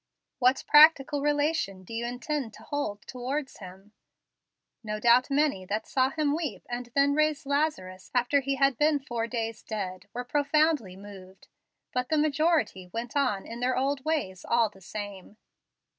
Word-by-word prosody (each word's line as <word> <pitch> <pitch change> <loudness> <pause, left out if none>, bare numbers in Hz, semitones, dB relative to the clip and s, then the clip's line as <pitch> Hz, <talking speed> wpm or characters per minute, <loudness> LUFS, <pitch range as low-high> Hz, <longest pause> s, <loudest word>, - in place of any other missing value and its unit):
What 255 +1 +3
practical 295 -2 +6
relation 290 -10 0
do 205 - -11
you 235 +1 -2
intend 245 0 -3
to - - -14
hold 250 -9 -4
towards 265 +3 -4
Him? 190 +1 -12 0.9
No 215 -1 -4
doubt 240 +4 +4
many 280 -8 +1
that 215 +3 -2
saw 260 -1 +1
Him 300 0 0
weep, 320 -3 -4
and 245 0 -5
then 280 0 +4
raise 305 -1 +1
Lazarus 275 -11 -2
after 250 +3 +3
he 275 0 -1
had 275 -2 +2
been 300 0 +4
four 240 -4 -4
days 225 -2 -4
dead, 195 -3 -5
were 245 - -4
profoundly 290 - +1
moved, 195 -1 -13 0.4
but 250 0 -1
the 315 - +2
majority 300 - +1
went 230 +4 -5
on 250 -9 0
in 230 +1 -8
their 255 +1 0
old 270 +1 0
ways 280 - -2
all 235 -2 +2
the 195 - -19
same. 205 +1 -8
250 Hz, 160 wpm, -28 LUFS, 210-290 Hz, 0.9 s, practical